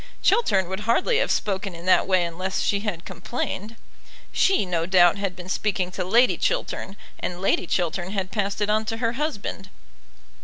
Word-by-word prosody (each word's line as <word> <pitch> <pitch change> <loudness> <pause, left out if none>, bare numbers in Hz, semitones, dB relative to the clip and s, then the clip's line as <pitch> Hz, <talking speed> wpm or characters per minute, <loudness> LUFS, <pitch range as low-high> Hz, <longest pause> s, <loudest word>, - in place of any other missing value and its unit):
Chiltern 195 - +3
would 190 +2 -4
hardly 440 - +3
have - - +1
spoken 195 -2 -1
in 170 +1 -10
that 185 - +4
way 185 -2 +3
unless 185 +3 -3
she 200 - +1
had 200 -5 -4
complained. 205 +3 -4 0.6
She, 380 - +3
no 170 -2 -1
doubt, 180 -1 +5
had 195 -2 -3
been 180 0 -9
speaking 185 -2 -1
to 185 - -3
Lady 235 +7 +4
Chiltern, 355 - -2 0.2
and 175 0 -4
Lady 185 -2 +1
Chiltern 175 +1 -1
had 195 -2 -3
passed 205 -1 -2
it 205 - +1
on 215 +1 +2
to 225 +1 -3
her 230 0 0
husband. 230 -8 -4
195 Hz, 180 wpm, -24 LUFS, 180-215 Hz, 0.6 s, doubt